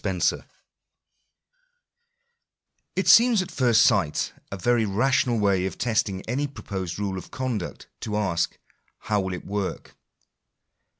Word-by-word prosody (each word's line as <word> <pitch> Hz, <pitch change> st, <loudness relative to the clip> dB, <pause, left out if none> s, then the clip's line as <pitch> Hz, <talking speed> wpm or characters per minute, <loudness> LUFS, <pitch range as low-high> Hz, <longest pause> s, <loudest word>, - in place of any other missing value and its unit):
■ -, -, 0 dB, 2.5 s
It -, -, -1 dB
seems 230 Hz, -4 st, +6 dB
at 185 Hz, -, -10 dB
first 120 Hz, -6 st, +4 dB
sight 95 Hz, -10 st, +1 dB, 0.2 s
a 100 Hz, -, -4 dB
very 120 Hz, +4 st, +2 dB
rational 120 Hz, +3 st, +1 dB
way 100 Hz, -3 st, +2 dB
of 95 Hz, -, -7 dB
testing 105 Hz, -4 st, 0 dB
any 135 Hz, +5 st, -1 dB
proposed 95 Hz, -10 st, -6 dB
rule 100 Hz, -2 st, -2 dB
of -, -, -12 dB
conduct 120 Hz, -7 st, -4 dB
to 105 Hz, -1 st, -3 dB
ask 90 Hz, -5 st, -1 dB, 0.2 s
— -, -, -43 dB
How 105 Hz, -2 st, +2 dB
will 95 Hz, -1 st, -3 dB
it -, -, -9 dB
work 100 Hz, -1 st, -4 dB
105 Hz, 130 wpm, -25 LUFS, 95-120 Hz, 2.5 s, seems